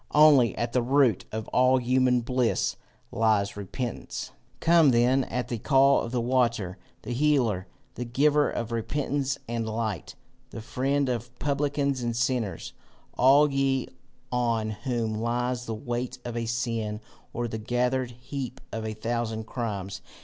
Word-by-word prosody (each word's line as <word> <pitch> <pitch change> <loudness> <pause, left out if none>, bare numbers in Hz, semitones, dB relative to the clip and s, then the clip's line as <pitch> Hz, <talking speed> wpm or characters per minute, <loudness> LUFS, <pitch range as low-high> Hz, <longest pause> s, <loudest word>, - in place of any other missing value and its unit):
Only, 145 -5 +6
at 120 0 -2
the 125 - +3
root 125 -5 +3
of 110 0 -4
all 130 +1 +4
human 125 0 +2
bliss 115 - 0 0.4
lies 105 -3 +1
repentance. 105 +4 -5 0.3
"Come 165 -3 +5
then 125 +2 +3
at 125 0 -3
the 120 - -3
call 135 +2 +4
of 115 - -5
the 125 - 0
Water, 115 -6 0 0.2
the 110 - -5
Healer, 120 -8 +1 0.3
the 125 - -4
Giver 145 +5 +3
of 120 0 -4
repentance 140 +3 -1
and 115 -1 -2
light, 110 -6 -3 0.3
the 120 - -8
Friend 135 +5 0
of 120 0 -4
publicans 140 -2 0
and 120 -1 -2
sinners, 120 -7 -1 0.4
all 140 +3 +5
ye 135 -1 +1 0.4
on 115 -3 0
whom 115 0 -2
lies 125 +1 -1
the 110 - -2
weight 120 +2 -4
of 120 -1 -4
a 115 -1 -2
sin, 115 -3 -2 0.3
or 120 0 -2
the 110 -1 -5
gathered 125 +3 0
heap 125 +1 -6
of 110 - -4
a 110 - -4
thousand 115 0 -2
crimes. 100 -5 -4
120 Hz, 150 wpm, -27 LUFS, 115-130 Hz, 0.4 s, Only